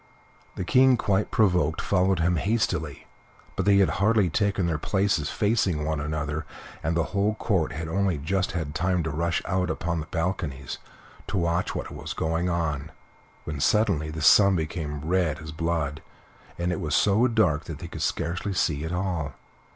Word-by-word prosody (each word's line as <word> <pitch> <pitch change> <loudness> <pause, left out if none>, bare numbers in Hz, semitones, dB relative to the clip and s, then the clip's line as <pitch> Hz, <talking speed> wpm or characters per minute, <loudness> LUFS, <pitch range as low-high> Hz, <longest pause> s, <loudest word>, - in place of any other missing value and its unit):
The - - -3
King, 130 +2 +5
quite 100 -1 +1
provoked, 90 -7 +2
followed 95 -2 +1
him 90 +1 +2
hastily, 80 - -1 0.5
but 95 - -1
they 100 -1 +6
had 95 -4 +4
hardly 105 -4 +3
taken 100 -1 +1
their 80 -3 -1
places 95 -5 0
facing 100 -8 +1
one 80 -1 -1
another, 75 0 -3 0.4
and 80 +1 -1
the 85 - +2
whole 100 +2 +1
Court 95 -8 0
had 80 +2 -4
only 95 0 0
just 90 +6 -1
had 80 -4 -3
time 90 +2 0
to 80 - -2
rush 85 +3 -1
out 90 -1 0
upon 85 +1 -2
the 80 - -6
balconies 80 -6 -3 0.5
to - - -2
watch 85 0 0
what - - -4
was - - -6
going 80 +2 -1
on, 80 -4 -2 0.5
when 75 -2 -5
suddenly 90 -4 +2
the 80 0 -5
sun 100 +4 +7
became 80 -2 -3
as 70 - -8
red 85 -2 +1
as 80 -1 -8
blood, 80 -3 -2 0.6
and 85 +1 -1
it 90 - -2
was 75 -3 0
so 105 +5 +4
dark 100 -10 +2
that 80 -4 -6
they 85 - -8
could 80 -2 -7
scarcely 85 +6 -2
see 75 -5 0
at 80 - -4
all. 90 -6 -2
85 Hz, 180 wpm, -26 LUFS, 80-95 Hz, 0.6 s, sun